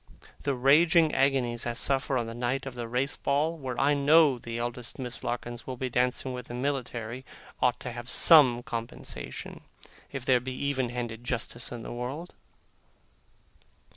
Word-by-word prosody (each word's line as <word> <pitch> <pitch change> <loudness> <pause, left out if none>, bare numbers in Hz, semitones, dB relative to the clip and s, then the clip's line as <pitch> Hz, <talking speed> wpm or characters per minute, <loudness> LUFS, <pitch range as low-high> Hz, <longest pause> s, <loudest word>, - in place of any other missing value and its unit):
The 140 -1 -1
raging 155 +5 +5
agonies 130 -4 +1
I 120 - -1
suffer 135 +2 0
on 120 - -1
the 115 - -6
night 125 +3 -2
of 135 - -6
the 120 -1 -5
Race 125 +4 0
Ball, 150 +4 0
where 130 -6 -5
I 145 +1 +4
know 145 -1 +5
the 115 0 -6
eldest 120 0 -4
Miss 125 -2 -5
Larkins 120 -1 -4
will 130 -1 -5
be 130 0 -3
dancing 125 +1 0
with 125 -1 -7
the 120 - -7
military, 125 -2 -3 0.4
ought 125 -1 +2
to 125 - -4
have 120 +1 -7
some 130 -8 +6
compensation, 115 -1 -6 0.5
if 135 -2 -6
there 130 -2 +4
be 130 +2 -5
even 130 -2 -1
handed 120 -1 -5
justice 120 -1 -2
in 120 -2 -6
the - - -6
world. 135 +8 -5
125 Hz, 170 wpm, -28 LUFS, 120-135 Hz, 0.5 s, some